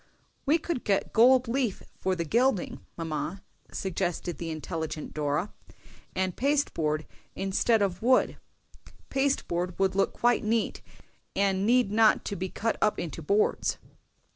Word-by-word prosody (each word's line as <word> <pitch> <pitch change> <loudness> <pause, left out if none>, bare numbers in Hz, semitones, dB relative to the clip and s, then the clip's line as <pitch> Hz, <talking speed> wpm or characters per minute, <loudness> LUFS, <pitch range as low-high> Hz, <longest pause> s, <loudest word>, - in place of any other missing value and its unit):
"We 305 +4 +5
could 335 -5 -3
get 200 -2 0
gold 250 +2 +6
leaf 240 -4 -1 0.2
for 190 -1 0
the 170 -1 -2
gilding, 235 - +1
mamma," 165 +3 -4 0.3
suggested 175 -2 -2
the 170 - -4
intelligent 160 -1 -4
Dora, 150 +6 -1 0.6
"and 185 -1 0
pasteboard 165 - 0 0.3
instead 200 +3 +2
of 185 -2 -2
wood; 255 +3 +3 0.7
pasteboard 185 -11 0
would 195 0 +2
look 195 0 +1
quite 240 0 +2
as 215 - -3
neat, 225 0 0 0.5
and 195 0 +1
need 245 -3 +4
not 220 0 +4
to 200 - -3
be 185 +1 -3
cut 225 +5 -1
up 210 - +2
into 165 -1 -5
boards." 200 +7 +1
195 Hz, 140 wpm, -28 LUFS, 175-235 Hz, 0.7 s, gold